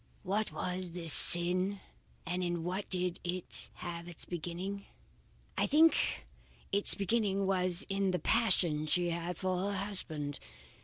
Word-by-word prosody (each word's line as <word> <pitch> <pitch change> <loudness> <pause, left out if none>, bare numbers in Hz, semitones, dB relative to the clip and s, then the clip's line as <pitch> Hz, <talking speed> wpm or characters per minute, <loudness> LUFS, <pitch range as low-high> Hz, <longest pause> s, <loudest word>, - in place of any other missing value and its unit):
What 210 +4 -2
was 180 -1 -5
this 165 -3 +4
sin, 180 +3 +7 0.5
and 180 +2 -3
in 175 -1 -3
what 185 +4 -5
did 180 -1 -2
it 180 0 -4
have 170 -1 -8
its 175 -3 -8
beginning? 180 +4 -6 0.7
I - - 0
think 320 +2 +2 0.5
its 200 +1 +6
beginning 200 -1 -1
was 185 -2 -1
in 195 -1 -1
the 180 - -1
passion 175 -9 +1
she 175 +2 0
had 170 +1 -5
for 185 -1 -2
her 200 - -4
husband. 160 -8 -5
180 Hz, 140 wpm, -31 LUFS, 175-195 Hz, 0.7 s, sin